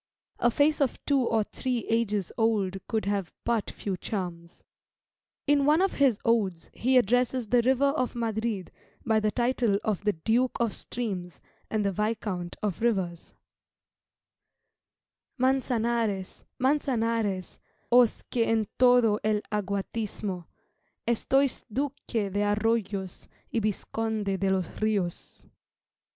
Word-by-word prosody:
A 240 Hz, -, +4 dB
face 290 Hz, +5 st, +2 dB
of 270 Hz, -, +1 dB
two 280 Hz, -2 st, +3 dB
or 225 Hz, -3 st, +2 dB
three 250 Hz, +2 st, -3 dB
ages 210 Hz, -5 st, 0 dB
old 205 Hz, -4 st, +1 dB
could 220 Hz, -2 st, -1 dB
have 200 Hz, -4 st, -1 dB
but 230 Hz, -3 st, 0 dB
few 195 Hz, -2 st, -4 dB
charms. 175 Hz, -3 st, -5 dB, 0.8 s
In 290 Hz, -1 st, +3 dB
one 300 Hz, +3 st, +4 dB
of 385 Hz, +1 st, +2 dB
his 265 Hz, -7 st, +3 dB
odes 195 Hz, -8 st, +1 dB
he 255 Hz, +2 st, +2 dB
addresses 245 Hz, +2 st, +2 dB
the 245 Hz, +1 st, +4 dB
River 260 Hz, +3 st, +3 dB
of 265 Hz, -4 st, -1 dB
Madrid 220 Hz, -4 st, -2 dB, 0.3 s
by 220 Hz, -1 st, +3 dB
the 215 Hz, 0 st, +1 dB
title 240 Hz, -3 st, +1 dB
of 210 Hz, -2 st, -1 dB
the 210 Hz, 0 st, +2 dB
Duke 230 Hz, +10 st, +1 dB
of 235 Hz, -3 st, +1 dB
Streams, 185 Hz, -9 st, -5 dB, 0.3 s
and 215 Hz, -2 st, 0 dB
the 200 Hz, -, +2 dB
Viscount 205 Hz, -3 st, -2 dB
of 205 Hz, -2 st, -2 dB
Rivers 190 Hz, -7 st, -1 dB, 2.0 s
"Mançanares, 235 Hz, -6 st, 0 dB
Mançanares, 230 Hz, -, 0 dB, 0.3 s
Os 245 Hz, -2 st, +5 dB
que 235 Hz, -, 0 dB
en 225 Hz, -1 st, +1 dB
todo 245 Hz, -4 st, +5 dB
el 215 Hz, -1 st, +1 dB
aguatismo, 200 Hz, -2 st, -3 dB, 0.6 s
Estois 265 Hz, +3 st, +2 dB
Duque 250 Hz, -5 st, -2 dB
de 205 Hz, -, +1 dB
Arroyos, 205 Hz, -3 st, -1 dB, 0.3 s
Y 230 Hz, -, +2 dB
Visconde 215 Hz, -1 st, -2 dB
de 195 Hz, -, +1 dB
los 190 Hz, -1 st, +1 dB, 0.2 s
Rios." 200 Hz, -5 st, -2 dB
220 Hz, 125 wpm, -28 LUFS, 200-245 Hz, 2.0 s, Os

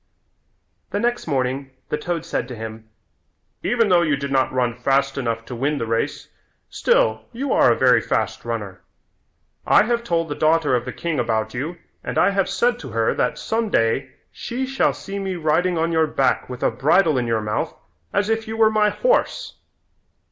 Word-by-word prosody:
The 205 Hz, -, -2 dB
next 240 Hz, -1 st, -1 dB
morning 135 Hz, -1 st, -1 dB, 0.2 s
the 150 Hz, -, 0 dB
toad 170 Hz, 0 st, -3 dB
said 120 Hz, -, -2 dB
to 125 Hz, -, -7 dB
him, 110 Hz, 0 st, -8 dB, 0.7 s
"Even 230 Hz, -3 st, +2 dB
though 175 Hz, -2 st, +5 dB
you 155 Hz, -4 st, +2 dB
did 140 Hz, 0 st, -5 dB
not 130 Hz, -1 st, +2 dB
run 125 Hz, -2 st, 0 dB
fast 135 Hz, +2 st, +1 dB
enough 115 Hz, -4 st, -2 dB
to 125 Hz, -, -7 dB
win 140 Hz, +5 st, 0 dB
the 115 Hz, -, -2 dB
race, 115 Hz, 0 st, -2 dB, 0.4 s
still 110 Hz, 0 st, +2 dB
you 265 Hz, +3 st, -2 dB
are 120 Hz, -, +5 dB
a -, -, +3 dB
very 125 Hz, -3 st, +5 dB
fast -, -, -1 dB
runner. 105 Hz, -6 st, -5 dB, 0.8 s
I -, -, +5 dB
have 235 Hz, +1 st, 0 dB
told 165 Hz, -6 st, 0 dB
the -, -, -1 dB
daughter 155 Hz, -3 st, +2 dB
of 120 Hz, -1 st, -1 dB
the 125 Hz, -, -4 dB
king 165 Hz, -1 st, -3 dB
about 110 Hz, -2 st, -1 dB
you 150 Hz, +8 st, -4 dB, 0.3 s
and -, -, -4 dB
I -, -, +4 dB
have 195 Hz, -1 st, 0 dB
said 240 Hz, +5 st, +1 dB
to 135 Hz, -, -8 dB
her 115 Hz, 0 st, +1 dB
that 125 Hz, -, 0 dB
some 225 Hz, 0 st, -1 dB
day 115 Hz, -, +1 dB, 0.2 s
she 250 Hz, +2 st, -4 dB
shall 270 Hz, +1 st, +1 dB
see 200 Hz, 0 st, -6 dB
me 190 Hz, -1 st, -3 dB
riding 175 Hz, +2 st, +1 dB
on 165 Hz, +1 st, 0 dB
your 160 Hz, -1 st, +3 dB
back 135 Hz, -4 st, 0 dB
with 125 Hz, -1 st, -6 dB
a -, -, +3 dB
bridle 150 Hz, +5 st, +3 dB
in 120 Hz, -, -2 dB
your 115 Hz, -1 st, 0 dB
mouth 105 Hz, 0 st, -2 dB, 0.4 s
as 200 Hz, -, +1 dB
if 225 Hz, 0 st, -1 dB
you 220 Hz, 0 st, -4 dB
were 220 Hz, -1 st, +5 dB
my 210 Hz, -1 st, +3 dB
horse." -, -, 0 dB
145 Hz, 195 wpm, -22 LUFS, 120-195 Hz, 0.8 s, though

